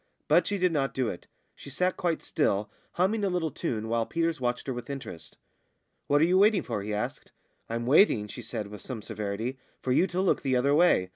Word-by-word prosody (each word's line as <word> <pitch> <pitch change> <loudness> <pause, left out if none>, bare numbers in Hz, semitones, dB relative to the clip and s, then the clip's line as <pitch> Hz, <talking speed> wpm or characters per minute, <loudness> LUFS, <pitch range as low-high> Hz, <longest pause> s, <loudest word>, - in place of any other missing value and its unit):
But - - +4
she 205 - 0
did 180 -1 +2
not 140 -4 -1
do 130 -4 0
it; 85 - -8 0.3
she - - -12
sat 180 +7 0
quite 170 -3 -1
still, 105 -8 0 0.2
humming 200 +4 +1
a 200 - +2
little 175 -4 -1
tune, 110 -3 -3
while 115 0 0
Peters 165 -3 -1
watched 125 0 -1
her 130 - -2
with 120 +1 -7
interest. 135 - -8 0.7
"What 145 +1 +3
are - - +6
you 180 +2 +3
waiting 205 -1 +4
for?" 115 -4 -3
he 105 +2 -5
asked. 105 0 -4 0.4
"I'm 115 +1 -2
waiting," 125 - +4
she 120 - -8
said, 115 -2 -4
with 105 -1 -10
some 120 -5 -6
severity, 110 +4 -4 0.2
"for 130 - -2
you 170 +9 +4
to 180 0 -3
look 190 -1 +2
the 135 -2 +1
other 135 +3 +3
way. 150 - +4
130 Hz, 220 wpm, -28 LUFS, 110-170 Hz, 0.7 s, are